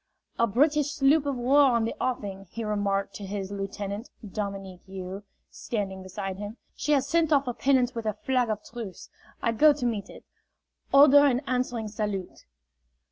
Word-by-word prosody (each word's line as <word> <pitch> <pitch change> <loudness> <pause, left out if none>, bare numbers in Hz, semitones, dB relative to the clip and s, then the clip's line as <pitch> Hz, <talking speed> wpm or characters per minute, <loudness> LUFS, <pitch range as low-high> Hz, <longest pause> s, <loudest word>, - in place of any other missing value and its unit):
"A 235 - +4
British 295 +6 +2
sloop 290 0 +3
of 280 - 0
war 260 +1 +4
in 225 - +1
the 230 - -2
offing," 200 -6 -3
he 230 - -5
remarked 200 -2 -1
to 205 - -9
his 195 0 -4
lieutenant, 200 +2 -5 0.2
Dominique 195 -2 -5
You, 190 +1 -6 0.3
standing 195 -4 -4
beside 190 0 -5
him. 205 +3 -6 0.2
"She 300 - 0
has 275 -1 +2
sent 320 +1 +2
off 280 -2 +4
a 245 - -1
pinnace 255 -1 +2
with 230 -2 -4
a 215 - 0
flag 250 -3 +2
of 215 -1 -2
truce. 225 -6 -8 0.3
I 230 - +2
go 295 +7 +6
to 275 -3 -4
meet 210 -4 -2
it. - - -12 0.7
Order 285 +1 +8
an 255 -2 +1
answering 250 -4 -2
salute." 205 -3 -4
225 Hz, 175 wpm, -27 LUFS, 200-270 Hz, 0.7 s, Order